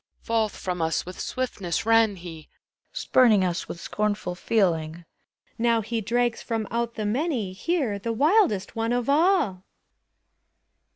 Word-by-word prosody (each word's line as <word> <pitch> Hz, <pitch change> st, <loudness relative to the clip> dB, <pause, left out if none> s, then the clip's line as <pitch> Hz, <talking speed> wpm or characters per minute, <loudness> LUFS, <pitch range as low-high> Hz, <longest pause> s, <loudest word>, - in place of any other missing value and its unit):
Forth 225 Hz, -2 st, 0 dB
from 180 Hz, -2 st, -3 dB
us 160 Hz, 0 st, 0 dB
with 180 Hz, +1 st, -9 dB
swiftness 205 Hz, -10 st, -3 dB
ran 225 Hz, -2 st, +4 dB
he! 165 Hz, -3 st, -10 dB, 0.4 s
Spuming 220 Hz, -7 st, +3 dB
us 175 Hz, -1 st, -2 dB
with 170 Hz, -, -7 dB
scornful 210 Hz, -1 st, -2 dB
feeling. 170 Hz, -5 st, 0 dB, 0.5 s
Now 230 Hz, -1 st, +3 dB
he 225 Hz, +1 st, -3 dB
drags 240 Hz, +2 st, 0 dB
from 225 Hz, -3 st, -3 dB
out 235 Hz, 0 st, -2 dB
the 215 Hz, -, -3 dB
many 235 Hz, -, -1 dB
Here, 250 Hz, -, -1 dB
the 230 Hz, +4 st, -3 dB
wildest 280 Hz, -, +2 dB
one 225 Hz, +1 st, 0 dB
of 245 Hz, -1 st, -1 dB
all. 295 Hz, -, +2 dB
220 Hz, 135 wpm, -25 LUFS, 185-240 Hz, 0.5 s, ran